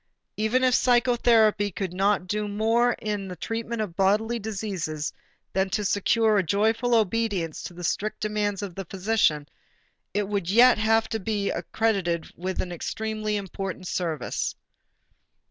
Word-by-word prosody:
Even 220 +5 +1
if 255 -1 +4
psychotherapy 235 -4 +3
could 185 -1 -4
not 195 0 +1
do 210 +2 -2
more 225 +4 +2
in 205 -2 -4
the 180 - -6
treatment 225 +4 -3
of 180 -6 -7
bodily 215 +5 +2
diseases 190 -8 -3 0.4
than 190 0 +1
to 210 +2 -1
secure 215 +2 +3
a - - +1
joyful 225 +7 +2
obedience 205 -6 0
to 175 - -8
the 175 - -8
strict 210 +5 -2
demands 210 -1 -1
of 195 -3 -5
the 195 +2 -6
physician, 185 -6 +1 0.6
it 205 0 -1
would 200 -4 -2
yet 240 +3 +6
have 225 +1 +3
to 225 - -2
be 205 -1 -1
accredited 190 -7 -1
with 185 +2 -3
an 180 - -7
extremely 215 +4 -3
important 195 -2 -5
service. 165 -5 -2
210 Hz, 145 wpm, -26 LUFS, 190-225 Hz, 0.6 s, yet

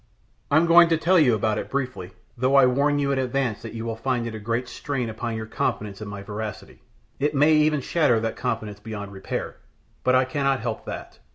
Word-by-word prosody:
I'm 155 +3 +4
going 170 0 +7
to 165 - +3
tell 175 +3 +4
you 125 -7 +4
about 110 0 0
it - - -6
briefly, 130 -9 -3 0.3
though 130 +3 +1
I 135 -2 +7
warn 140 +3 +2
you 140 -1 +1
in 135 - +1
advance 130 -3 -1
that - - -8
you 115 0 -5
will 115 -1 -3
find 120 +1 -1
it 115 - -5
a 110 - -6
great 115 +4 -2
strain 125 -1 -3
upon 115 +1 -4
your 110 0 -4
confidence 105 -2 -3
in 105 - -6
my 100 -1 -7
veracity. 105 0 -7 0.4
It 145 +1 0
may 150 +3 +5
even 150 -1 +3
shatter 130 -5 +2
that 115 0 -2
confidence 105 -3 -3
beyond 105 -2 -7
repair; 95 -1 -5 0.5
but 130 - +3
I 130 0 +4
cannot 135 -1 0
help 115 -1 -4
that. - - -8
125 Hz, 215 wpm, -24 LUFS, 110-140 Hz, 0.5 s, going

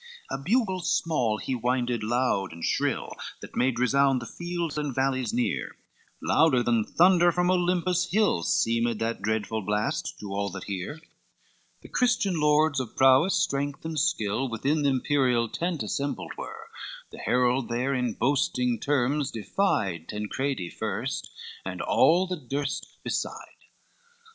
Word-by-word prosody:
LVII - - 0
A 135 - -6
bugle 195 - +1
small 155 -10 +1
he 130 - -3
winded 125 -1 0
loud 110 -3 0
and 85 0 -5
shrill, - - 0 0.3
That - - -10
made 125 -1 +1
resound 135 +2 +3
the 120 - -7
fields 170 +1 -4
and 150 -4 -2
valleys 130 -3 0
near, 120 +1 -1 0.5
Louder 135 -7 +4
than 115 -2 +2
thunder 175 - +4
from 180 +1 +1
Olympus 180 0 +1
hill 210 - +2
Seemed 115 +5 +1
that 115 +1 -2
dreadful 110 +1 -1
blast 105 +2 -2
to 100 -2 -6
all 100 0 -1
that 95 - -6
hear; 100 - -5 0.8
The - - -10
Christian 220 -8 +1
lords 150 -1 +3
of 125 -4 -5
prowess, 135 +8 +5
strength 140 +2 -1
and 160 -1 -2
skill, 135 - 0
Within 135 +7 0
the 140 - +3
imperial 130 -3 +2
tent 170 +2 -2
assembled 140 +7 -3
were, - - -8 0.4
The - - -10
herald 125 0 +1
there 125 +4 0
in 125 -3 0
boasting 125 - +1
terms 140 +1 +1
defied 100 - -1
Tancredi 105 -1 -3
first, 110 - -3 0.3
and - - -5
all 175 +3 +4
that 170 -10 -6
durst 140 0 -2 0.2
beside. - - -4
130 Hz, 145 wpm, -27 LUFS, 115-160 Hz, 0.8 s, prowess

